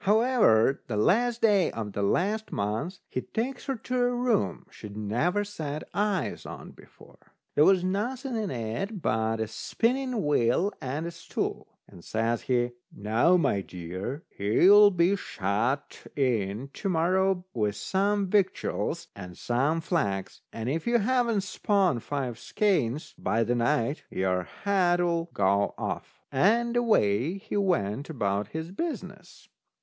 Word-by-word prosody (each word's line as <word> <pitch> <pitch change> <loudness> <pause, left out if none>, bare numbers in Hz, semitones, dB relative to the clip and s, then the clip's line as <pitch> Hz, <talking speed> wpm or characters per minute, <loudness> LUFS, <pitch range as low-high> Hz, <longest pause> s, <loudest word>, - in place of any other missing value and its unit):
However, 210 - +4
the 110 - -2
last 235 - +2
day 205 -4 +4
of 105 -3 -5
the 100 - -2
last 205 - 0
month 110 - -3
he 130 - -3
takes 245 - -4
her 270 - 0
to 250 +2 -5
a 245 0 +3
room 245 - 0
she'd 105 0 -10
never 125 - 0
set 155 -7 -5
eyes 205 -2 -1
on - - -9
before. - - -18 0.3
There 150 - +5
was 190 -2 +4
nothing 240 +7 -2
in 215 -3 -1
it 130 - -4
but 110 0 0
a 110 - -1
spinning 245 - -1
wheel 145 - +2
and 140 +5 -3
a 170 - -4
stool. 170 -1 -5
And 85 - -15
says 115 +1 -1
he: 120 -1 0 0.2
"Now, 110 - +2
my 100 - +1
dear, 95 - -6
here 100 +1 -2
you'll 205 +2 +9
be 180 +1 +2
shut 115 - -2
in 120 -2 0
to 195 - -3
morrow 185 +2 +1
with 105 -3 0
some 200 - 0
victuals 190 -1 0
and 90 -1 -9
some 140 +7 0
flax, 100 - -2
and 115 0 -5
if 155 - -2
you 240 0 +4
haven't 235 -1 +1
spun 190 - +1
five 130 -2 -4
skeins 155 - 0
by 115 +1 +1
the 120 - 0
night, 120 +3 +1
your 90 -1 0 0.2
head'll 175 -4 +2
go 100 - +1
off." - - -5
And 230 - +2
away 165 - +2
he 215 +2 -7
went 145 - 0
about 100 -8 -1
his 160 +8 -6
business. 200 - -6
165 Hz, 145 wpm, -27 LUFS, -, 0.3 s, you'll